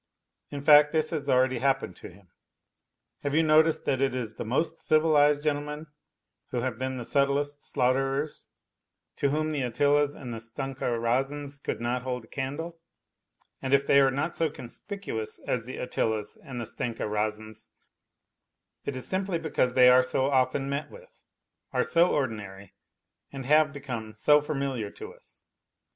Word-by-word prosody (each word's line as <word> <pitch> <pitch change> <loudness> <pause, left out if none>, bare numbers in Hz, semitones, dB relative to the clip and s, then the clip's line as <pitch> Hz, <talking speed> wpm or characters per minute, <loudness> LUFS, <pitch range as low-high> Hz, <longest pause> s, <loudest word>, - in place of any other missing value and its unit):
In 145 -1 -6
fact, 150 0 +7
this 155 -1 +1
has 145 -4 -3
already 130 -1 +3
happened 135 -7 0
to - - -10
him. 90 0 -19 0.9
Have 145 0 -2
you 160 - +4
noticed 155 +1 +4
that 135 -1 0
it 135 -2 +1
is 115 -4 -3
the - - -6
most 155 +8 -1
civilized 150 -2 +3
gentlemen 150 0 -2 0.6
who 120 - -2
have 125 -2 -3
been 130 0 -2
the 120 - -5
subtlest 145 +2 0
slaughterers, 135 +4 -1 0.7
to 140 - +1
whom 155 +2 0
the 145 -2 -1
Attilas 145 +4 +2
and 125 -5 -7
Stenka 135 +4 -5
Razins 135 +4 -1
could - - -3
not 120 +2 -1
hold 125 -2 -4
a - - -26
candle, 155 +5 -5 0.8
and 135 +1 +3
if 140 0 +1
they 140 - +5
are 135 -1 +5
not 145 +5 -2
so 165 -1 +1
conspicuous 135 - -6
as 115 -2 -1
the 130 - -7
Attilas 110 -4 -2
and 130 -5 -7
Stenka 115 +1 -4
Razins 110 +1 -3 1.1
it 140 - -4
is 130 - -2
simply 190 -1 0
because 155 -6 0
they 125 -1 +7
are 125 0 +7
so 130 +2 0
often 130 +1 +1
met 140 +2 -3
with, - - -16 0.5
are - - +2
so 170 +1 +3
ordinary 100 -7 -3 0.6
and 135 -2 -7
have 150 +2 +4
become 125 -6 -6
so 150 +6 +5
familiar 135 -7 -3
to - - -10
us. - - -15
135 Hz, 160 wpm, -27 LUFS, 125-150 Hz, 1.1 s, fact